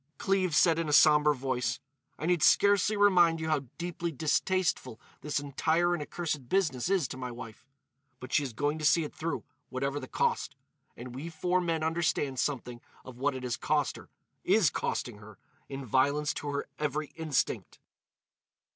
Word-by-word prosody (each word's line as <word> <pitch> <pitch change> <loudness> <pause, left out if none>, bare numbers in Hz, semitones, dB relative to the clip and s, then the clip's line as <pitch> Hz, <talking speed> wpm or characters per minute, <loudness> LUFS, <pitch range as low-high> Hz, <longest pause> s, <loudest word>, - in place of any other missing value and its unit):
Cleves 185 -5 +1
said 165 -1 +4
in 165 -2 -2
a - - 0
sombre 150 0 +6
voice: 125 -1 -2 0.4
"I 155 - -5
need 175 -1 +2
scarcely 205 +4 +4
remind 175 -5 +5
you 160 0 -3
how 145 -3 0
deeply 170 -1 -3
distasteful 160 - 0 0.2
this 150 -1 -1
entire 160 +5 +1
and 175 - -2
accursed 150 -5 -4
business 165 -8 +1
is 190 -8 +2
to - - -6
my 125 -1 -5
wife. 115 -2 -10 0.5
But 130 - -9
she - - +4
is 135 -3 -4
going 145 +6 -1
to - - -6
see 150 +2 +4
it 150 - -7
through, 165 +1 -3 0.3
whatever 140 +2 -2
the 130 - -8
cost. - - -1 0.4
And 120 0 -8
we 140 +6 -6
four 180 +3 0
men 165 -2 -1
understand 160 -5 0
something 125 -4 -2 0.2
of 125 -1 -11
what 140 +1 0
it 130 - -6
has 125 -2 -2
cost - - 0
her—is - - -1
costing - - -3
her—in 110 +5 -11
violence 140 +5 +2
to 145 - -6
her 140 0 -3
every 150 0 -2
instinct." 155 -5 -2
150 Hz, 170 wpm, -30 LUFS, 130-165 Hz, 0.5 s, sombre